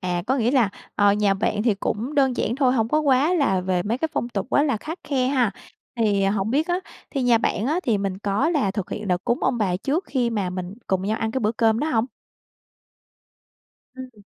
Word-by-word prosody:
À, 180 -2 -2
có 265 +2 +1
nghĩa 235 -1 +1
là, 250 -6 +3 0.3
ờ, 205 -1 +4
nhà 205 -1 +2
bạn 210 +1 -1
thì 225 -4 +2
cũng 225 +7 -3
đơn 265 -4 +2
giản 235 +4 -1
thôi, 260 -3 +3
hổng 225 -3 +1
có 305 +5 +2
quá 290 +3 +3
là 270 - +2
về 180 -1 0
mấy 225 +5 -2
cái 320 - -1
phong 240 - -2
tục 205 -5 -3
quá 285 - +4
là 275 -6 +1
khắt 315 - -7
khe 260 -3 +1
ha. 255 -6 +2 0.5
Thì 205 -4 +2
hổng 195 +1 0
biết 295 +6 +1
á, 350 - +1 0.3
thì 275 - -2
nhà 240 -2 +4
bạn 225 -1 -1
á, 315 +6 0
thì 225 - +1
mình 195 -1 -3
có 205 +9 0
là 290 - +1
thực 195 -1 -4
hiện 210 -1 -5
đợt 180 0 0
cúng 240 - 0
ông 255 -2 +1
bà 190 -5 +1
trước 290 - -1
khi 245 -3 0
mà 200 -5 -1
mình 185 +1 -5
cùng 190 -1 0
nhau 215 +3 -1
ăn 225 0 -1
cái 260 - -2
bữa 215 -1 +1
cơm 225 -1 +2
đó 305 - 0
hông? 225 -4 +2 1.9
Ừm. 255 -5 -10
225 Hz, 240 wpm, -23 LUFS, 200-265 Hz, 1.9 s, ờ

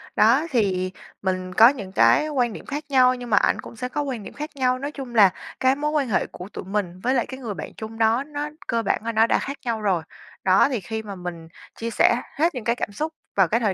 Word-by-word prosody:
đó 240 +8 +4
thì 190 -7 +1 0.3
mình 185 -1 -2
có 225 +4 +8
những 210 -9 -5
cái 185 - +4
quan 245 -6 0
điểm - - -9
khác 290 +2 -4
nhau 255 -2 +5
nhưng 245 -1 -8
mà 205 - +4
ảnh - - +2
cũng - - -11
sẽ 250 +2 -4
có 295 - -2
quan 260 -7 -4
điểm - - -9
khác 300 +1 -5
nhau. 255 -2 +1
Nói 285 +2 -4
chung 265 -5 -8
là 205 -3 +8 0.3
cái 260 +1 +3
mối 300 +1 -1
quan 285 -5 0
hệ - - +1
của 180 +2 -9
tụi - - -7
mình 185 -2 -3
với 255 - +2
lại 245 -3 +1
cái 260 - -8
người 230 -6 -4
bạn - - -6
chung 220 0 -7
đó 225 +3 +3
nó 295 0 -5 0.2
cơ 230 0 +1
bản 205 - 0
là 230 - 0
nó 225 0 +4
đã - - +2
khác 280 +1 -5
nhau 225 -2 -1
rồi. 185 -6 +1 0.4
Đó, 190 +7 +5
thì 255 -5 -1
khi 220 +4 -5
mà 200 -2 -7
mình 175 -2 -7 0.3
chia 230 - -4
sẻ 235 +1 +4 0.2
hết 325 +1 +1
những 250 - -4
cái 235 +2 +1
cảm 225 - -3
xúc 310 +10 -3 0.2
vào 195 -3 +5
cái 230 +7 +1
thời 210 -5 +1
230 Hz, 265 wpm, -23 LUFS, 200-265 Hz, 0.4 s, có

